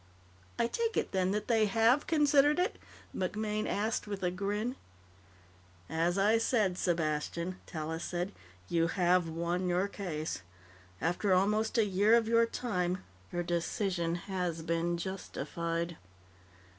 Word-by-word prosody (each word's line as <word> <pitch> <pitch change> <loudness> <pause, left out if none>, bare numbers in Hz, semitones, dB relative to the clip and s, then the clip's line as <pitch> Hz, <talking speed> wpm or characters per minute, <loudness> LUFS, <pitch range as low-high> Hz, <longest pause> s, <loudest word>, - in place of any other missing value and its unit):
"I 235 - +2
take 455 - -1
it, - - 0
then, 185 -1 +1
that 210 +2 -1
they 225 -3 +3
have 225 +7 +3
considered 295 -2 +4
it?" 365 +5 0 0.4
MacMaine 210 +3 -1
asked 215 +1 -1
with 200 -2 -4
a 180 - +2
grin. 205 +6 -2 1.2
"As 170 +3 +1
I 210 +3 +4
said, 215 -6 +2
Sepastian," 170 +1 -1
Tallis 160 0 -4
said, 180 +2 -2 0.4
"you 165 - +2
have 180 -1 +2
won 170 +3 -1
your 180 +3 +2
case. 160 - -4 0.6
After 175 - +2
almost 210 +5 +2
a 225 - +5
year 205 +3 +4
of 230 -2 +3
your 230 0 +4
time, 185 -7 -2 0.3
your 175 0 -1
decision 170 0 -1
has 175 -3 -3
been 170 +1 0
justified." 170 -2 -3
185 Hz, 130 wpm, -32 LUFS, 170-215 Hz, 1.2 s, a